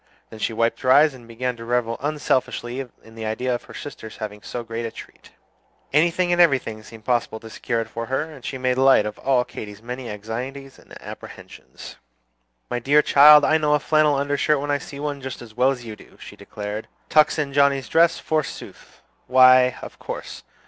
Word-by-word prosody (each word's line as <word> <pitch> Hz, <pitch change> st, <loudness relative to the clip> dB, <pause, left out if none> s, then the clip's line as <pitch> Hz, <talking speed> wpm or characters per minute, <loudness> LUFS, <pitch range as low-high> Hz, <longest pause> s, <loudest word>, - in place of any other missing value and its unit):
Then 110 Hz, -, -10 dB
she 110 Hz, -, -1 dB
wiped 115 Hz, +1 st, 0 dB
her 130 Hz, -, +2 dB
eyes, 150 Hz, +2 st, +6 dB
and 120 Hz, -3 st, -14 dB
began 125 Hz, +2 st, -3 dB
to 115 Hz, -, -9 dB
revel 115 Hz, -1 st, -1 dB
unselfishly 135 Hz, -3 st, -2 dB, 0.2 s
in 110 Hz, -, -16 dB
the 110 Hz, -1 st, -6 dB
idea 125 Hz, +4 st, -1 dB
of 120 Hz, -, -4 dB
her -, -, -13 dB
sister's 120 Hz, -6 st, -9 dB
having 105 Hz, -1 st, -7 dB
so 120 Hz, +2 st, -6 dB
great 115 Hz, +1 st, -5 dB
a 115 Hz, -, -3 dB
treat. -, -, -13 dB, 0.6 s
Anything 170 Hz, +4 st, +2 dB
and 175 Hz, -, +4 dB
everything 130 Hz, -9 st, +2 dB
seemed 110 Hz, 0 st, -14 dB
possible 120 Hz, -3 st, -1 dB
to 115 Hz, 0 st, -12 dB
secure 115 Hz, +1 st, -2 dB
it 115 Hz, -, -6 dB
for 115 Hz, +1 st, -6 dB
her; 135 Hz, +2 st, -1 dB
and 155 Hz, -5 st, -12 dB
she 135 Hz, -, -5 dB
made 130 Hz, 0 st, 0 dB
light 135 Hz, -5 st, +5 dB
of 105 Hz, 0 st, -6 dB
all 130 Hz, -2 st, +2 dB
Katy's 105 Hz, 0 st, -9 dB
many 125 Hz, +1 st, -6 dB
anxieties 125 Hz, +6 st, -7 dB
and -, -, -14 dB
apprehensions. -, -, -11 dB, 0.7 s
"My 125 Hz, -, -3 dB
dear 145 Hz, +5 st, +3 dB
child, 150 Hz, +1 st, +8 dB
I 160 Hz, +1 st, +3 dB
know 150 Hz, -1 st, +2 dB
a -, -, +1 dB
flannel 155 Hz, 0 st, +2 dB
undershirt 145 Hz, +1 st, +1 dB
when 145 Hz, +1 st, -3 dB
I 145 Hz, -, +1 dB
see 140 Hz, -, -10 dB
one, 145 Hz, -1 st, -4 dB
just 130 Hz, -1 st, -6 dB
as 115 Hz, -2 st, -12 dB
well 125 Hz, +3 st, +3 dB
as 125 Hz, -3 st, -4 dB
you 110 Hz, -2 st, -7 dB
do," -, -, -18 dB
she -, -, -11 dB
declared. 105 Hz, +1 st, -7 dB, 0.2 s
"Tucks 155 Hz, +1 st, +4 dB
in 145 Hz, -2 st, -2 dB
Johnnie's 140 Hz, -3 st, +2 dB
dress, 165 Hz, +6 st, +3 dB
forsooth! 155 Hz, -2 st, -5 dB, 0.2 s
why, 130 Hz, 0 st, +6 dB
of -, -, -10 dB
course. -, -, -7 dB
130 Hz, 205 wpm, -22 LUFS, 115-145 Hz, 0.7 s, child